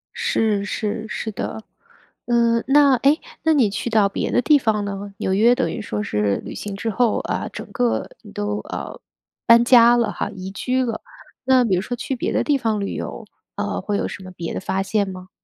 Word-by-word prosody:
是， 210 -3 0
是， 215 +1 -3
是 220 0 -4
的。 220 +1 -5 0.6
嗯， 235 -1 +2
那， 280 -1 +5
哎， 280 +6 +3 0.2
那 320 - +4
你 260 -8 +3
去 205 +4 -3
到 215 -3 +3
别 - - -3
的 - - +3
地 300 +3 +5
方 215 -4 0
呢？ 200 0 -6
纽 190 - -1
约 230 +5 +5
等 260 - -1
于 230 - -5
说 105 - -3
是 105 -1 0
旅 - - -7
行 205 -1 -5
之 225 +3 -3
后， 235 +1 +1
啊， - - -3
整 - - -7
个 245 -2 0
你 210 - -13
都， 205 0 -3
呃， - - -6 0.5
搬 235 0 +7
家 240 -1 +7
了 235 - +1
哈， - - -3
移 190 -2 -7
居 255 +6 -1
了。 230 - -4 0.4
那 260 -1 +5
比 195 -5 +2
如 180 - 0
说 245 +5 -4
去 265 +2 -3
别 240 - -2
的 - - +1
地 290 -2 +2
方 220 -4 -1
旅 200 - -3
游， - - -6 0.3
呃， - - -2
会 205 -1 -1
有 - - -1
什 190 - -8
么 185 - -10
别 170 -2 -6
的 - - -3
发 190 +1 -2
现 200 0 0
吗？ 185 0 -9
220 Hz, 235 characters per minute, -21 LUFS, 200-240 Hz, 0.6 s, 搬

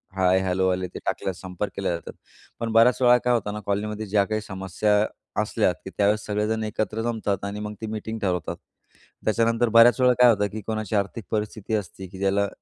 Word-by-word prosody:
हाय, 95 0 +3
hello 95 0 +1
आले 90 0 -1
ते - - -9
टाकल्यास 95 -2 -2
संपर्क 95 +2 -4
केला 100 - -2
जातात. 85 - -8 0.5
पण 115 -1 -2
बऱ्याच 120 +3 +5
वेळा 125 -1 +6
काय 125 - +4
होतं 105 -3 -1
ना 105 - -4
कॉलनीमध्ये 105 +2 -2
ज्या 100 0 +3
काही 110 +1 -2
समस्या 95 +1 -1 0.5
असल्यात, - - +1
की - - -5
त्यावेळेस 105 +1 +2
सगळेजण 105 +1 -1
एकत्र 110 0 -2
जमतात 105 -4 -2
आणि 100 +1 -4
मग 105 0 -5
ती 110 - -4
मीटिंग 110 +1 -5
ठरवतात. 90 -5 -2 0.7
त्याच्यानंतर 115 +1 +2
बऱ्याचवेळा 120 +3 +6
काय 125 - +8
होतं 105 -3 +2
की 110 0 -6
कोणाची 110 -1 -2
आर्थिक 100 +2 -1
परिस्थिती 105 0 -3
असते 95 -2 -5
की 95 - -12
ज्याला, 100 +1 +1
105 Hz, 190 wpm, -24 LUFS, 100-110 Hz, 0.7 s, काय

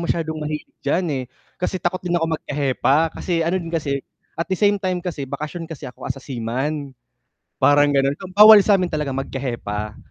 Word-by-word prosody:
masyadong 160 -2 -2
mahilig 150 0 -4
diyan, 165 +6 0
eh. 130 -2 -2 0.4
Kasi 180 - -1
takot 180 0 -2
din 175 -1 -1
ako 165 -1 0
magka-hepa, 145 +2 +1
kasi 170 -3 -1
ano 180 +3 0
din 165 - -7
kasi 140 -4 -1 0.4
at 165 - -2
the 190 - 0
same 205 +1 +2
time 185 -2 -2
kasi 150 -7 -4
bakasyon 155 +4 -5
kasi 160 -3 -8
ako 125 - -8
as - - -2
a 135 - -11
seaman, 135 +3 -3 0.6
parang 145 0 +5
gano'n. 135 0 +3
Um, 190 - -7
bawal 210 0 +10
sa'min 195 -3 +2
talaga 150 -2 -1
magka-hepa, 120 -6 -4
155 Hz, 185 wpm, -21 LUFS, 135-175 Hz, 0.6 s, bawal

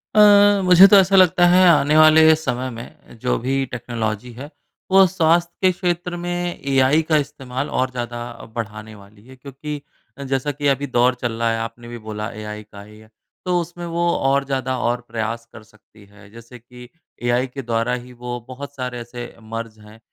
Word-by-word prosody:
अ, 205 -1 +6
मुझे 180 +1 +8
तो 205 - +6
ऐसा 195 0 +4
लगता 185 -1 +5
है 180 +1 +5
आने 150 -2 +3
वाले 155 0 +7
समय 130 -4 -3
में 115 0 -12
जो 125 - 0
भी 135 +2 -1
टेक्नोलॉज़ी 115 -1 -4
है 135 +5 -9 0.4
वो 190 0 +7
स्वास्थ्य 170 -1 +2
के 185 -1 +4
क्षेत्र 175 -1 -3
में 175 0 -4
एआई 135 +3 +3
का 155 - +4
इस्तेमाल 135 -2 -4
और 130 0 -1
ज़्यादा 120 -1 -5 0.3
बढ़ाने 110 -1 -6
वाली 100 +1 -18
है। 130 - -14
क्योंकि 140 +3 -8 0.5
जैसा 135 +2 -1
कि 145 +1 -3
अभी 140 +1 0
दौर 125 0 +2
चल 120 - -1
रहा 115 0 +1
है 115 - -1
आपने 115 +1 -7
भी 120 0 -8
बोला 105 0 -5
एआई 105 -1 -8
का 100 -1 -14
ही 105 +1 -15
है, 110 0 -18 0.4
तो 180 -1 +1
उसमें 175 +1 -8
वो 170 0 -1
और 135 +1 +1
ज़्यादा 130 -1 -2
और 120 +1 -1
प्रयास 115 0 -4
कर 115 - -12
सकती 105 -1 -22
है। 100 0 -18
जैसे 115 +2 -13
कि 125 +1 -15 0.3
एआई 120 +2 +1
के 135 +2 -8
द्वारा 115 0 -1
ही 125 0 -6
वो 120 0 -6
बहुत 140 +2 -9
सारे 125 -2 -5
ऐसे 120 0 -9
मर्ज़ 115 0 -7
हैं 105 +1 -16
125 Hz, 190 wpm, -20 LUFS, 115-155 Hz, 0.5 s, मुझे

